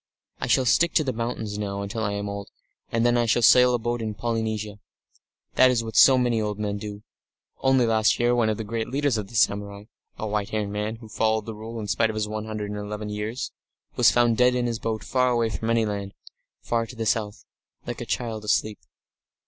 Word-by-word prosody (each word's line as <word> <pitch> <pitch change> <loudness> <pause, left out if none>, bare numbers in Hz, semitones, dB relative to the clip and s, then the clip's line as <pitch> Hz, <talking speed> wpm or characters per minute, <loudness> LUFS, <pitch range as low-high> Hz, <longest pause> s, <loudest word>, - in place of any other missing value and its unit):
I - - -2
shall 130 - +3
stick 170 +7 +3
to 155 - +4
the 130 -3 -2
mountains 110 -3 -4
now 100 -1 -3
until 100 +3 -4
I 100 -1 -1
am 100 0 -3
old, 100 0 -6 0.4
and 115 +1 +1
then 120 0 +3
I 120 - +1
shall 120 +2 +2
sail 125 +1 +6
a - - +1
boat 120 +1 -2
in 110 -2 -3
Polynesia. 110 -2 -3 0.7
That 130 - +6
is 120 -2 +1
what 110 0 -7
so 135 -1 +7
many 120 -3 +1
old 105 -1 -2
men 105 -1 -3
do. 105 0 -7 0.6
Only 130 -2 +3
last 110 -2 +3
year 120 0 +3
one 120 -2 +2
of 110 - -1
the 110 - -4
great 110 +1 -3
leaders 140 -3 0
of 105 - -5
the 120 - -12
samurai 100 -1 +1 0.3
a - - -4
white 105 -1 -2
haired 105 -2 -2
man, 105 +2 -3
who 110 0 -13
followed 110 0 0
the 115 - -5
Rule 110 +2 -7
in 105 - -4
spite 105 +3 +1
of 110 - -4
his 105 -1 -1
one 110 0 -4
hundred 105 -1 -4
and 105 - -4
eleven 105 +1 -5
years 105 +4 -4 0.4
was - - +6
found 120 -2 +3
dead 125 0 +4
in 125 -1 0
his 115 -2 -2
boat 110 -1 -3
far 125 -1 +1
away 120 -2 +1
from 110 +4 -3
any 115 -1 +2
land, 100 -2 -4 0.5
far 115 -1 -1
to 125 - -11
the 115 -1 -3
south, 105 -1 -1 0.4
lying - - -7
like - - -5
a - - -4
child 115 -3 -3
asleep...." 105 0 0
110 Hz, 235 wpm, -25 LUFS, 105-120 Hz, 0.7 s, so